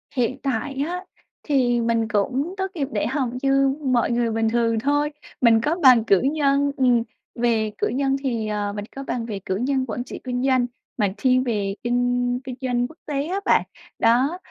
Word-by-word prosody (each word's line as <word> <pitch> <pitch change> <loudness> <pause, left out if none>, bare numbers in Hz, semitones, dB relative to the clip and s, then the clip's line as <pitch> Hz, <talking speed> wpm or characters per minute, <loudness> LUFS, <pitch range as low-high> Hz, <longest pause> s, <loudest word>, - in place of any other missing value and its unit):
Hiện 255 +1 0
tại 270 +1 -2
á, 360 +1 -4 0.4
thì 245 -5 +2
mình 230 -1 +1
cũng 255 - -1
tốt 380 - 0
nghiệp 280 -5 -1
đại - - -1
học 265 -2 -1
như 275 0 +3
mọi 245 -2 +2
người 235 -1 +1
bình 225 0 +1
thường 230 -1 +1
thôi. 290 +4 +1 0.3
Mình 225 -2 +5
có 305 +7 +1
bằng 250 -4 +7
cử 200 -4 +3
nhân, 280 0 +2
ừm, 245 -3 +3 0.3
về 230 -3 +1
cử - - 0
nhân 270 +3 0
thì, 230 -5 -1
ờ, 205 -1 -2
mình 205 0 -4
có 275 - -5
bằng 245 -3 -3
về 210 -4 -5
cử 190 - -1
nhân 260 +4 0
quản 245 +1 -4
trị 250 - -8
kinh 250 0 -2
doanh 260 -2 +3 0.3
mà 205 -4 +1
thiên 255 +2 +3
về 205 -5 -1
kinh 245 0 +1
kinh 255 -2 -6
doanh 245 -1 0
quốc 320 - -17
tế 285 -1 -2
á 380 +3 -1
bạn. - - +4 0.4
Đó, 255 +9 +3
245 Hz, 200 wpm, -23 LUFS, 230-275 Hz, 0.4 s, bằng